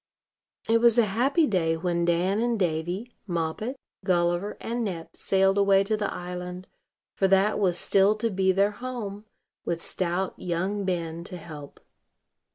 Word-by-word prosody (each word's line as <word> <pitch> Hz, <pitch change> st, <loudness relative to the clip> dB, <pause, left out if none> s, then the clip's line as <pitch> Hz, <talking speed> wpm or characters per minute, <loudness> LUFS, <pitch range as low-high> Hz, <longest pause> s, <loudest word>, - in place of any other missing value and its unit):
It 230 Hz, 0 st, +3 dB
was 235 Hz, -1 st, +5 dB
a 235 Hz, -, +6 dB
happy 260 Hz, -, +2 dB
day 165 Hz, -, +1 dB
when 170 Hz, 0 st, 0 dB
Dan 175 Hz, +4 st, +1 dB
and 235 Hz, 0 st, +1 dB
Davy, 180 Hz, +7 st, -2 dB
Moppet, 175 Hz, +8 st, -2 dB, 0.3 s
Gulliver, 175 Hz, +1 st, +1 dB
and 235 Hz, +1 st, -3 dB
Nep 175 Hz, -6 st, -5 dB
sailed 195 Hz, +1 st, +2 dB
away 195 Hz, -1 st, +5 dB
to 215 Hz, +2 st, 0 dB
the 210 Hz, -1 st, -2 dB
island; 180 Hz, +1 st, -6 dB, 0.5 s
for 195 Hz, -, +2 dB
that 195 Hz, +2 st, +3 dB
was 180 Hz, -4 st, +2 dB
still 195 Hz, +3 st, +4 dB
to 225 Hz, +1 st, -1 dB
be 190 Hz, 0 st, +2 dB
their 200 Hz, +2 st, +2 dB
home, 215 Hz, -3 st, -6 dB, 0.4 s
with 170 Hz, -1 st, -3 dB
stout 185 Hz, +1 st, -1 dB
young 185 Hz, +4 st, -2 dB
Ben 170 Hz, -2 st, -2 dB
to 180 Hz, -1 st, -7 dB
help. 150 Hz, -4 st, -10 dB
190 Hz, 155 wpm, -26 LUFS, 175-210 Hz, 0.5 s, a